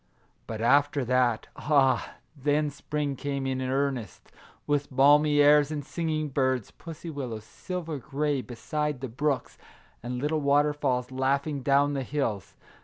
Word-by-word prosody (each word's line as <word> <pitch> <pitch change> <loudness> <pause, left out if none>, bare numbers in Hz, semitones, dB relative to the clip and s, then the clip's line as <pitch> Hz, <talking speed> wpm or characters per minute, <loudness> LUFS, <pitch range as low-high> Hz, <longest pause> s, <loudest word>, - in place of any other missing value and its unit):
But 110 -1 -5
after 140 +2 +3
that, 125 -2 +2
— - - -38
ah, 140 -3 +2 0.2
then 145 +1 0
spring 145 0 -3
came 140 0 -3
in 130 -1 -1
earnest, 130 -2 -2 0.3
with 145 -1 0
balmy 145 +2 +5
airs 145 0 +6
and 150 -3 -4
singing 155 -2 -2
birds, 130 -4 0
pussy 165 0 -9
willows, 125 -7 -5
silver 165 - -6
gray, 145 +1 -1
beside 145 +3 -3
the 135 - -3
brooks, 135 +2 -2 0.4
and 125 +1 -4
little 150 +4 -1
waterfalls 140 -3 +1
laughing 140 +2 0
down 140 +2 +3
the 135 - -1
hills. 125 -8 -3
140 Hz, 140 wpm, -27 LUFS, 130-150 Hz, 0.4 s, airs